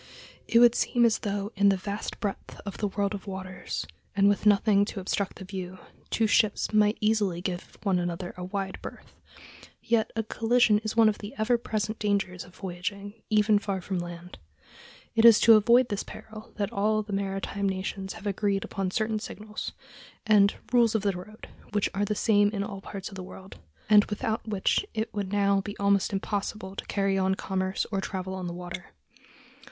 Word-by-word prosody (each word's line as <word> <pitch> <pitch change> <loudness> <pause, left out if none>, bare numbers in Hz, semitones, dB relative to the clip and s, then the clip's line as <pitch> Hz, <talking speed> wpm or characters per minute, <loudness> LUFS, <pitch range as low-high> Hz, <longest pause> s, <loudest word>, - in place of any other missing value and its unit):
It 230 - +3
would 240 0 +7
seem 240 0 +2
as 230 - +3
though 205 0 -3
in 200 0 +5
the 195 - +3
vast 200 +3 -5
breadth 205 -2 -5
of 200 - -6
the 210 - +1
"world 200 +1 -1
of 205 0 -7
waters," 185 - -5 0.3
and 200 0 +4
with 205 +1 +2
nothing 205 0 +5
to 205 - -5
obstruct 195 +1 -2
the 190 - -9
view, 185 -1 -6 0.3
two 225 - +1
ships 215 0 +2
might 210 0 +4
easily 210 -5 +1
give 180 0 -5
one 190 -4 +2
another 175 0 -3
a 180 - -7
wide 190 +1 -4
berth; - - -10 0.7
yet 230 -2 +1
a 225 - 0
collision 225 -1 +3
is 215 0 -4
one 225 -1 +7
of 215 - +1
the 205 +1 -8
ever 220 +3 +2
present 215 -2 -2
dangers 200 -3 -1
of 180 - -17
voyaging, 200 +2 -5 0.2
even 215 -1 +4
far 200 -2 -2
from 185 0 -3
land. 175 0 -8 0.7
It 225 - +3
is 230 -2 +9
to 230 - +8
avoid 235 +4 +5
this 205 -2 -1
peril 215 0 -10
that 200 -2 -2
all 215 +2 +1
the 205 -1 -7
maritime 195 0 -2
nations 190 0 -4
have 215 -2 -11
agreed 200 0 0
upon 195 -1 -3
certain 215 +2 -1
signals, 215 0 -6 0.5
and 205 -2 +5 0.2
"rules 235 -2 +4
of 215 - +1
the 200 - +2
road" 195 +4 -10 0.3
which 205 -1 +1
are 200 +1 0
the 210 - -1
same 205 -1 +3
in 200 -2 -2
all 200 -1 -6
parts 195 -1 -7
of 195 - -11
the 190 - -6
world, 190 +1 -11 0.3
and 210 -1 +7
without 220 +1 -3
which 205 - +1
it 220 +1 -2
would 200 -2 -3
now 200 -1 +3
be 205 +1 -7
almost 200 0 +2
impossible 195 0 -3
to - - -5
carry 195 -1 +1
on 190 0 +2
commerce 190 0 -2
or 195 -2 0
travel 190 -1 -4
on 185 -1 -4
the 170 - -4
water. 180 0 -8
200 Hz, 195 wpm, -27 LUFS, 190-215 Hz, 0.7 s, is